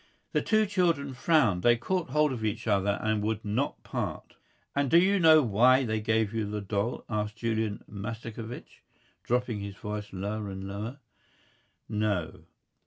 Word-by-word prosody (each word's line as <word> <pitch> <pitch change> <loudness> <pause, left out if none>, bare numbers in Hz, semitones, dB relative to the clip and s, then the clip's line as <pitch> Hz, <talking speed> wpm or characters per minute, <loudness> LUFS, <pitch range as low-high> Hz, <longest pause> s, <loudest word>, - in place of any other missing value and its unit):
The - - +1
two 215 -1 +3
children 170 -8 +1
frowned. 125 - +3
They 120 +3 +5
caught 175 +6 -2
hold 150 +2 +2
of 115 -3 -5
each 105 -2 -2
other 100 -2 +2
and 110 -1 +1
would 110 +1 -2
not 115 +8 -2
part. - - -5 0.4
"And 140 -1 +1
do 165 - +6
you 195 +3 +4
know 160 -3 +7
why 125 +4 +4
they 110 -1 -1
gave 110 0 +1
you 110 -2 -1
the 105 0 -3
doll?" 100 +3 -2
asked 105 -1 -2
Julian 110 -2 -1
Mastakovich, 115 +3 -7 0.4
dropping 125 -3 -1
his 100 -1 -6
voice 105 0 -6
lower 100 +2 -4
and 95 0 -6
lower. 105 +7 -5 0.9
"No." 105 -5 -2
110 Hz, 160 wpm, -29 LUFS, 105-130 Hz, 0.9 s, know